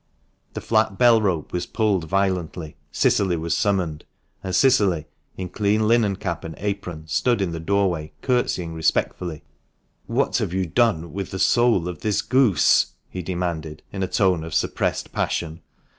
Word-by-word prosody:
The - - -5
flat 110 -3 +1
bell 120 -2 +5
rope 90 -7 -1
was 90 - -2
pulled 105 -7 0
violently. 90 -3 -1 0.2
Cicily 90 +3 +2
was 80 0 -1
summoned, 90 -7 0 0.4
and 95 -2 -2
Cicily, 100 - +3 0.3
in 95 - -4
clean 105 +3 +1
linen 110 -3 +3
cap 85 -4 -4
and 80 -1 -7
apron, 95 -5 -4
stood 120 +7 +1
in 95 -3 -1
the 85 - -4
doorway 90 -3 0
curtseying 120 -10 0
respectfully. 80 0 -1 0.3
" - - -45
What - - +1
have - - -2
you 95 -1 0
done 85 -3 +1
with 100 0 -4
the 95 - -5
soul 115 -4 +3
of 90 -3 -6
this 105 +3 0
goose 130 -8 +3
?" - - -45
he 90 - -4
demanded, 85 -4 -4
in 95 - -4
a 95 - 0
tone 90 -4 +1
of 80 - -6
suppressed - - -1
passion. 80 0 -2
95 Hz, 165 wpm, -23 LUFS, 85-105 Hz, 0.4 s, bell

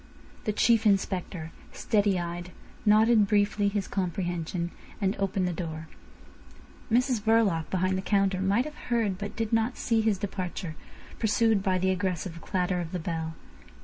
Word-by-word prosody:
The 215 - +1
Chief 225 +1 +3
Inspector, 185 -4 0 0.2
steady 205 -4 +1
eyed, 175 +1 -5 0.4
nodded 215 0 +5
briefly 205 0 +2
his 200 -1 -1
comprehension, 175 -2 -2 0.3
and 195 -1 +1
opened 195 -1 0
the 180 - -1
door. 160 -2 -5 1.0
Mrs 250 -1 +2
Verloc, 210 -7 +2
behind 185 0 +1
the - - -2
counter, 195 -2 +1
might 200 +6 +2
have 305 - -6 0.2
heard 220 -6 +1
but 205 0 -5
did 225 -1 -2
not 225 +3 +1
see 230 -2 +1
his 215 -2 +2
departure, 185 -3 -4 0.5
pursued 220 -1 +3
by 190 -2 +1
the 190 +1 +1
aggressive 180 -2 -2
clatter 180 0 -1
of 170 0 -6
the - - 0
bell. 160 -1 -3
195 Hz, 150 wpm, -28 LUFS, 180-215 Hz, 1.0 s, nodded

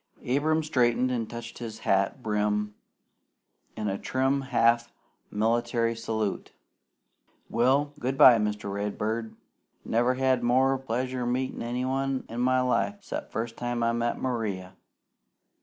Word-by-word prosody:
Abram 155 +5 +2
straightened 125 -4 +2
and 115 -3 -2
touched 115 0 -8
his 115 -2 -6
hat 100 +6 +1
brim 105 0 0 1.0
in 110 -1 -2
a 100 0 -2
trim 135 +1 0
half 120 -3 +2 0.4
military 115 +2 +1
salute. 110 -3 -3 1.0
"Well, 135 +5 +2
good 130 +2 -2
bye, 120 -4 +8
Mr. 105 -1 -2
Redbird. 105 +2 -3 0.5
Never 120 +3 +2
had 130 -1 +2
more 130 +3 +3
pleasure 125 0 -2
meetin' 130 +2 -2
anybody 130 +3 -1
in 115 - -5
my 130 +1 +3
life 200 +11 0
'cept - - -6
first 115 0 -4
time 120 -1 -2
I 115 - +2
met 120 0 -1
Maria. 105 -7 -3
120 Hz, 125 wpm, -27 LUFS, 110-130 Hz, 1.0 s, bye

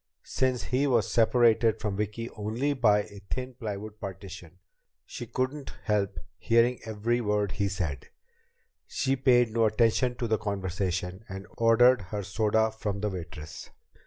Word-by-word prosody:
Since 130 -4 0
he 130 +6 +1
was 120 -6 +2
separated 115 -1 +4
from 105 -2 -2
Vicki 105 +3 -3
only 115 +7 -1
by 105 -6 +3
a 100 - -12
thin 130 0 -4
plywood 105 -3 -6
partition, 95 -3 -8 0.5
she 120 - -7
couldn't 130 +4 -3
help 105 -3 0 0.2
hearing 115 +2 +3
every 115 +2 -1
word 105 -2 0
he 100 0 -1
said. 90 -7 -3 0.8
She 135 0 0
paid 125 -3 +4
no 115 -1 +3
attention 115 +3 +2
to 120 - -2
the 110 -2 +1
conversation, 95 -2 -3
and 95 0 -7
ordered 120 +1 +5
her 100 +2 -5
soda 110 +2 +1
from 105 -2 -4
the 105 -1 -1
waitress. 80 -4 -8
110 Hz, 145 wpm, -28 LUFS, 100-120 Hz, 0.8 s, ordered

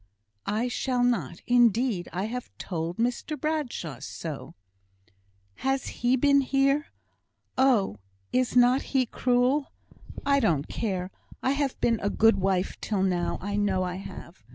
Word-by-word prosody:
"I 220 +4 0
shall 250 0 0
not, 235 -8 0
indeed. 240 -5 +3
I 185 +2 -2
have 240 +3 -4
told 170 -1 -4
Mr 245 +5 -1
Bradshaw 260 - -3
so." 150 +2 -7 1.0
"Has 270 0 -1
he 245 +2 +4
been 280 +2 +4
here? 275 +2 +2 0.7
Oh! 245 - +3 0.4
is 255 -1 +1
not 250 +2 +5 0.2
he 260 - +4
cruel? 255 +4 +1 0.5
I 280 0 +4
don't 155 - +1
care. 190 -4 -3 0.3
I've 275 0 0
been 230 -2 +2
a 205 - +1
good 225 +2 +4
wife 190 -1 0
till 200 -3 0
now. 180 -2 0
I 200 +1 -2
know 195 -3 +1
I 180 0 -3
have. 195 - -10
240 Hz, 135 wpm, -27 LUFS, 190-260 Hz, 1.0 s, not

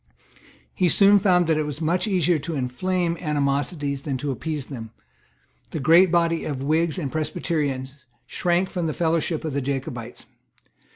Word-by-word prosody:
He 180 -2 +2
soon 200 +3 +6
found 180 -3 +3
that 160 -1 +1
it 155 - 0
was 150 0 -5
much 170 +6 0
easier 180 -4 +2
to 160 +3 -5
inflame 170 +7 -1
animosities 145 -1 -1
than 140 -2 -3
to 140 +2 -3
appease 150 +1 -4
them. 115 -6 -8 0.8
The 160 - -4
great 165 +6 +5
body 170 -1 +2
Of 135 -3 -4
Whigs 160 +4 +1
and 145 -7 -3
Presbyterians 145 -4 -3 0.2
shrank 175 +7 0
from 175 -3 -2
the 155 - -3
fellowship 165 -1 0
of 155 - -3
the 140 - -1
Jacobites. 130 -3 -5
155 Hz, 160 wpm, -24 LUFS, 140-175 Hz, 0.8 s, soon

